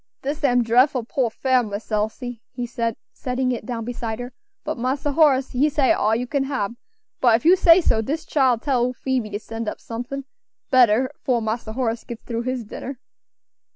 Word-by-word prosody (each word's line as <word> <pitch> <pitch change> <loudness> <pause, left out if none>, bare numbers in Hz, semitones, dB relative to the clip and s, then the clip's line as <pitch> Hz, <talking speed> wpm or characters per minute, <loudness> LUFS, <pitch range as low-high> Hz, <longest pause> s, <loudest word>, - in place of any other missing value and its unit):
"Dis 290 +3 -3
am 245 -3 +4
drefful 245 +1 +3
poor 255 -3 0
fare, 260 +2 +2
Miss 210 -1 -6
Elsie," 220 +3 -2
he 245 -1 -4
said, 230 -1 -2 0.2
setting 255 0 -1
it 230 -3 -4
down 230 -2 -3
beside 230 -2 -4
her, 245 +1 -7 0.3
"but 310 -4 -4
Massa 270 +4 -1
Horace 275 -3 +3
he 275 +5 +2
say 285 -3 +2
it - - +6
all 220 +1 +2
you 245 +2 -1
can 275 +1 -1
hab; 255 -6 -2 0.5
but 240 -3 +5
if 230 - -2
you 350 +3 +8
say 355 -1 +6
so, 225 -9 +2
dis 300 +8 -3
chile 260 -5 +3
tell 260 -1 0
ole 250 +1 0
Phoebe 255 -3 -2
to 205 - -3
send 225 0 -5
up - - -7
somethin' 245 +4 -6 0.5
better 255 0 +5
fore 250 -3 +2
Massa 220 0 -3
Horace 235 -2 -1
gits 235 -1 -8
through 230 -1 -3
his 255 0 -2
dinner." 255 +5 -7
245 Hz, 200 wpm, -23 LUFS, 230-270 Hz, 0.5 s, you